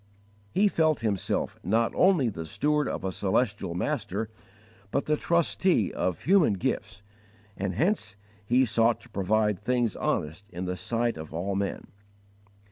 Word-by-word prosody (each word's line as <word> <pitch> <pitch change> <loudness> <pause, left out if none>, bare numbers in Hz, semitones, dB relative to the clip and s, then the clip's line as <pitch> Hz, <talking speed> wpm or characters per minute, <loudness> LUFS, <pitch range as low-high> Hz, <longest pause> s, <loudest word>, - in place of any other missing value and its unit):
He 205 - +4
felt 155 - +2
himself 105 -4 -1
not 115 +5 +1
only 180 -9 +4
the 80 -6 -6
steward 150 - +1
of - - -4
a 95 - -1
celestial 100 -2 0
Master, 110 -2 -2 0.6
but 140 - -1
the 150 - +2
trustee 170 - +1
of 90 -2 -2
human 185 - +4
gifts, 100 +1 -3 0.5
and 95 -1 -3
hence 160 - 0 0.3
he 125 +5 +3
sought 115 0 +2
to 120 - -16
"provide 105 0 +1
things 120 0 0
honest 85 +7 -2
in 90 -1 -5
the 90 0 -2
sight 115 +5 -1
of 80 0 -8
all 95 +4 -2
men." 100 0 -2
110 Hz, 145 wpm, -27 LUFS, 95-135 Hz, 0.6 s, He